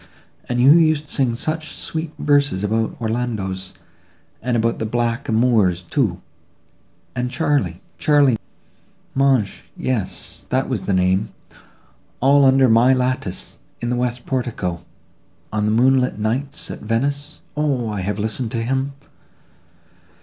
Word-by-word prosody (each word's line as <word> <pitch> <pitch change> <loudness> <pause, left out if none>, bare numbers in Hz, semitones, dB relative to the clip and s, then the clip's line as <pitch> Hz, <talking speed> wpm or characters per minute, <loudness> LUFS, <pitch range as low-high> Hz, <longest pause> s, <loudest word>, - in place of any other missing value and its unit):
And 120 0 0
who 140 +7 +7
used 155 -2 +2
to - - -5
sing 125 -4 +1
such 155 +4 -3
sweet 160 -1 -3
verses 145 -9 +2
about 110 +2 -1
Orlandos 110 -5 -3 0.7
and 120 0 0
about 115 0 0
the 110 - -1
Black 120 +3 -1
a - - +1
moors, 110 -6 +3
too; 110 - 0 1.0
and 125 0 -1
Charly—Charly—magne, 135 - 0 0.3
yes, 115 -8 -2
that 130 +1 +1
was 110 -8 -2
the 100 - +1
name, 95 +2 +2 0.9
all 140 +2 +5
under 135 0 +5
my 120 +3 +5
lattice, 125 -7 -2 0.2
in 120 0 -2
the - - +1
west 125 0 -2
portico, 115 -10 -2 0.7
on 105 -1 +1
the - - +2
moonlight 130 +2 +3
nights 125 +7 -2
at - - -7
Venice? 140 +7 -2
O! 135 -7 0
I 105 -2 -3
have 100 +3 -2
listened 110 +3 -1
to 115 -1 -1
him! 135 +3 -1
125 Hz, 130 wpm, -21 LUFS, 110-135 Hz, 1.0 s, who